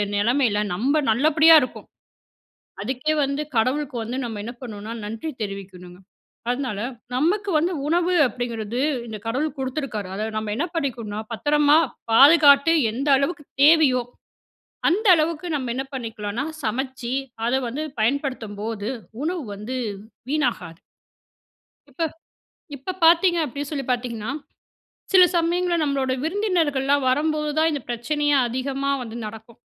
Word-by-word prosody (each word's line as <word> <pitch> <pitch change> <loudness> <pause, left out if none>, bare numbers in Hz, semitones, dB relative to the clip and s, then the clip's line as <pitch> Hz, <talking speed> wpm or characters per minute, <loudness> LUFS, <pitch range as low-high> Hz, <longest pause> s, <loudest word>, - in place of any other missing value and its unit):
நெலமையில 220 0 +2
நம்ப 270 +11 +1
நல்லபடியா 310 +6 +6
இருக்கோம். 255 - -7 1.0
அதுக்கே 270 +4 -1
வந்து 280 +2 -2
கடவுளுக்கு 255 +3 0
வந்து 235 +3 -4
நம்ம 220 -3 -6
என்ன 235 - -5
பண்ணணுனா 215 -2 -7
"நன்றி" 225 +9 -5
தெரிவிக்கணுங்க. 190 -3 -8 0.5
அதனால 245 -5 -2 0.3
நமக்கு 385 +10 +1
வந்து 340 +4 0
உணவு 345 +3 +1
அப்டிங்கிறது 240 -1 -4 0.3
இந்த 220 -2 -6
கடவுள் 280 +6 -2
குடுத்துருக்காரு 255 -7 -3
அத 210 +2 -2
நம்ம 215 -1 -2
என்ன 325 +8 0
பண்ணிக்கணும்னா 235 -9 -3
பத்தரமா 295 +5 +3 0.3
பாதுகாத்து, 285 +3 +7 0.2
எந்த 270 +6 -3
அளவுக்கு 295 +3 -1 0.2
தேவையோ 290 -5 +5 0.9
அந்த 415 +7 0
அளவுக்கு 320 +1 -1
நம்ம 255 -4 -2
என்ன 265 +1 -3
பண்ணிக்கலனா 225 0 -4 0.2
சமைச்சி 255 +2 -3 0.3
அத 240 - 0
வந்து 285 +7 -4 0.2
பயன்படுத்தும்போது 225 -4 -2 0.3
உணவு 340 0 -2
வந்து 215 +6 -6 0.6
வீணாகாது. 245 - -1 1.1
இப்ப 280 +5 -5 0.7
இப்ப 280 +8 -5
பார்த்தீங்க 340 +1 +5
அப்டின்னு 285 +1 -5
சொல்லி 280 -3 -3
பார்த்தீங்கன்னா, 240 -2 -2 0.8
சில 375 -1 +8
சமயங்கள்ல 345 +1 +1
நம்மளோட 275 -3 0
விருந்தினர்கள்லாம் 315 -8 +1
வரும்போது 300 +3 +1
தான் 320 +1 +3
இந்த 290 - -2
பிரச்சனையே 290 +5 0
அதிகமா 270 +3 -2
வந்து 230 -1 -7
நடக்கும். 220 +2 -11
265 Hz, 120 wpm, -23 LUFS, 230-305 Hz, 1.1 s, சில